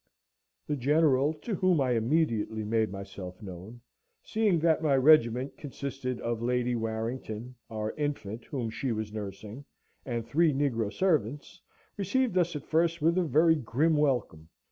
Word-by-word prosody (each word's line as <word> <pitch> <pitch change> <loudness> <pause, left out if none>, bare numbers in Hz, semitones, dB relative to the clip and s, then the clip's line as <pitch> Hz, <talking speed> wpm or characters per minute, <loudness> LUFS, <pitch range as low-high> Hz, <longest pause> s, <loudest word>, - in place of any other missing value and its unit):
The 150 - -1
General, 145 +1 +3
to 230 - -4
whom 185 -3 +2
I 130 -2 +1
immediately 115 -3 0
made 110 +1 +1
myself 95 -2 -8
known, 100 +4 -10 0.4
seeing 215 -5 +1
that 160 -1 +3
my 145 -4 +3
regiment 130 -2 +4
consisted 135 -3 -5
of 115 -1 -2
Lady 125 0 0
Warrington, 115 +1 -4 0.2
our 110 -1 -3
infant, 130 -7 -4
whom 120 -6 -3
she 130 +3 -2
was 110 -1 -3
nursing, 105 +4 -7 0.4
and 120 -3 -3
three 155 +6 +3
negro 120 -7 0
servants, 145 - -1 0.4
received 210 +3 0
us 175 -3 +2
at 150 - -5
first 165 +1 +1
with 165 +2 +2
a 185 - +2
very 160 +1 +4
grim 150 +5 +1
welcome. 120 - 0
130 Hz, 145 wpm, -29 LUFS, 110-155 Hz, 0.4 s, regiment